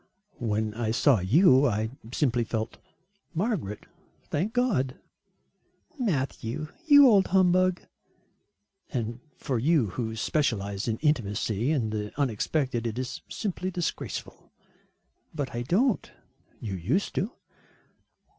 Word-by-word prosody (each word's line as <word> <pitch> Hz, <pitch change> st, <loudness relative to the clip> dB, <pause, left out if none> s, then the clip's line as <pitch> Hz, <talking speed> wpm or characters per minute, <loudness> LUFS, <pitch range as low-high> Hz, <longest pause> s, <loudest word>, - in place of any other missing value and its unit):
"When 110 Hz, -2 st, -1 dB
I 115 Hz, 0 st, -2 dB
saw 115 Hz, +1 st, +4 dB
you 135 Hz, -, +5 dB
I 110 Hz, -1 st, -1 dB, 0.2 s
simply 125 Hz, -4 st, +1 dB
felt 110 Hz, 0 st, -3 dB, 0.6 s
Margaret, 165 Hz, -, -2 dB, 0.4 s
thank 180 Hz, +9 st, -2 dB
God!" 210 Hz, -, +1 dB, 1.0 s
"Matthew, 150 Hz, -, -2 dB, 0.2 s
you 285 Hz, -2 st, +9 dB
old 200 Hz, -5 st, +5 dB
humbug." 185 Hz, -1 st, +3 dB, 1.1 s
"And 120 Hz, -2 st, -3 dB, 0.2 s
for 130 Hz, -4 st, -2 dB
you 135 Hz, -, +2 dB
who 110 Hz, -1 st, -3 dB
specialise 105 Hz, -7 st, -1 dB
in 115 Hz, -1 st, 0 dB
intimacy 115 Hz, -3 st, +1 dB
and 120 Hz, -8 st, 0 dB
the 105 Hz, -1 st, -3 dB
unexpected, 125 Hz, -1 st, 0 dB
it 115 Hz, 0 st, -4 dB
is 130 Hz, -1 st, -4 dB
simply 185 Hz, -3 st, -3 dB
disgraceful." 175 Hz, -3 st, -5 dB, 0.8 s
"But 145 Hz, -4 st, -3 dB
I 120 Hz, -, -2 dB
don't." 200 Hz, -, +1 dB, 0.5 s
"You 105 Hz, -4 st, -5 dB
used 115 Hz, -, -1 dB
to." 210 Hz, +7 st, -2 dB
130 Hz, 110 wpm, -27 LUFS, 110-175 Hz, 1.1 s, you